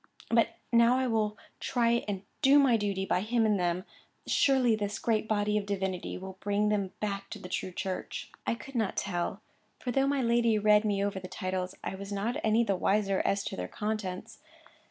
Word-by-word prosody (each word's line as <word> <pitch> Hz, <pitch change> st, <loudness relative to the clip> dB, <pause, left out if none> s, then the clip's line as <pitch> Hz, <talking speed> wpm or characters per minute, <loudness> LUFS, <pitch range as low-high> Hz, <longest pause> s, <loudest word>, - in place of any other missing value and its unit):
But 230 Hz, 0 st, +3 dB, 0.2 s
now 235 Hz, +2 st, +6 dB
I 260 Hz, -, +1 dB
will 215 Hz, -3 st, 0 dB, 0.2 s
try 235 Hz, -1 st, +1 dB
and 195 Hz, -2 st, -3 dB, 0.2 s
do 280 Hz, 0 st, +6 dB
my 270 Hz, -4 st, +5 dB
duty 200 Hz, -3 st, -1 dB
by 180 Hz, -, +1 dB
him 225 Hz, +2 st, +1 dB
and 210 Hz, -2 st, +2 dB
them. 175 Hz, +1 st, 0 dB, 0.4 s
Surely 260 Hz, -5 st, +3 dB
this 205 Hz, 0 st, -3 dB
great 220 Hz, -2 st, 0 dB
body 210 Hz, 0 st, +1 dB
of 200 Hz, -, -7 dB
divinity 190 Hz, -2 st, -2 dB
will 190 Hz, 0 st, -8 dB
bring 205 Hz, +1 st, +1 dB
them 200 Hz, -3 st, 0 dB
back 200 Hz, -1 st, -3 dB
to -, -, -6 dB
the -, -, -9 dB
true 185 Hz, -, -3 dB
church." 185 Hz, +1 st, -4 dB, 0.2 s
I -, -, +2 dB
could 230 Hz, +5 st, -11 dB
not 220 Hz, -5 st, -1 dB
tell, 190 Hz, +2 st, -2 dB, 0.3 s
for 250 Hz, -, -3 dB
though 270 Hz, +2 st, +2 dB
my 280 Hz, -2 st, +1 dB
lady 235 Hz, -1 st, +3 dB
read 210 Hz, 0 st, +4 dB
me 200 Hz, -1 st, +1 dB
over 200 Hz, -1 st, -2 dB
the 185 Hz, -, -8 dB
titles, 185 Hz, -1 st, -3 dB
I -, -, -3 dB
was 200 Hz, +1 st, -7 dB
not 205 Hz, +4 st, -1 dB
any 220 Hz, +2 st, +4 dB
the 200 Hz, -4 st, +1 dB
wiser 195 Hz, +1 st, +1 dB
as 200 Hz, 0 st, +1 dB
to -, -, -4 dB
their 90 Hz, -1 st, -4 dB
contents. 210 Hz, -, -4 dB
210 Hz, 200 wpm, -30 LUFS, 195-230 Hz, 0.4 s, now